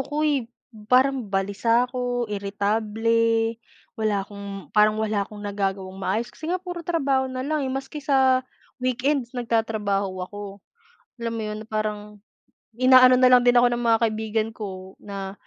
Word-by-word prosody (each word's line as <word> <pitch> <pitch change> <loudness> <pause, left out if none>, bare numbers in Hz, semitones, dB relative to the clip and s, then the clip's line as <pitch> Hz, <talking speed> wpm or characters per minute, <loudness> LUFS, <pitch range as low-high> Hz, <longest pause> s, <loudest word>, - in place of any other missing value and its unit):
ako, 295 +3 -2
eh, 275 -6 0 0.4
parang 255 -3 +3
balisa 200 +5 +1
ako, 245 -1 -2
iritable, 225 +3 0 0.4
wala 205 -3 0
akong 200 -1 -9
parang 215 0 +4
wala 215 -1 0
akong 210 -1 -10
nagagawang 195 -1 -3
maayos. 225 +4 -2
Kasi 315 - -8
nga 365 - +1
puro 355 -2 -7
trabaho 275 -6 0
na 255 0 -4
lang, 305 +1 -1
eh, 265 - -2
maski 270 +3 -5
sa 265 -2 +3 0.4
weekends 255 0 -1
nagtatrabaho 210 -5 -1
ako. 205 0 -9 0.7
Alam 230 - -2
mo 225 - -4
'yon, 215 0 -4
na - - -20
parang 215 -1 -1 0.8
inaano 255 0 +7
na 255 0 +5
lang 250 - +7
din 245 0 +4
ako 245 - +6
ng 240 0 +1
mga 225 - +5
kaibigan 220 0 -1
ko 190 -3 -8
na, 195 -1 -6
225 Hz, 155 wpm, -24 LUFS, 205-255 Hz, 0.8 s, inaano